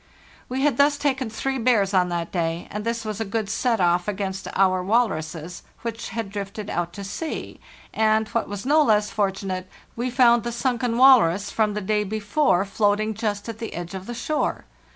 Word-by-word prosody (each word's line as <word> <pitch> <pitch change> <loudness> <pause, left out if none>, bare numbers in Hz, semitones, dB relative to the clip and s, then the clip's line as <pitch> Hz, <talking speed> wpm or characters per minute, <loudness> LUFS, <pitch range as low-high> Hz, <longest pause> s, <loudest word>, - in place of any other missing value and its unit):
We 260 +1 -2
had 290 0 +2
thus 285 +1 +4
taken 270 -4 -1
three 265 +4 -2
bears 220 -5 +2
on 180 -1 +3
that 170 -1 -3
day, 170 -1 -2
and 210 0 -4
this 230 0 -2
was 215 0 -4
a - - +2
good 215 0 -2
set 230 0 +1
off 175 0 +2
against 195 -1 -3
our 185 -1 +3
walruses, 175 -6 -1 0.2
which 230 0 -4
had 225 -3 -4
drifted 200 +1 -5
out 175 0 -2
to 200 - -7
sea, 310 +11 -5 0.3
and, 220 0 +2
what 230 - -1
was 205 +1 -6
no 300 +3 +5
less 210 -6 +3
fortunate, 195 -2 -2 0.3
we 240 +2 -2
found 240 -2 +5
the 235 - -4
sunken 240 -1 -1
walrus 205 -7 +5
from 215 -2 +1
the 210 - -2
day 210 +2 +1
before 210 0 +1
floating 210 +1 +1
just 205 -1 -3
at 225 -1 -6
the 225 - -5
edge 175 +1 -6
of 190 0 -7
the 240 - -5
shore. 300 +6 -2
215 Hz, 195 wpm, -24 LUFS, 195-235 Hz, 0.3 s, no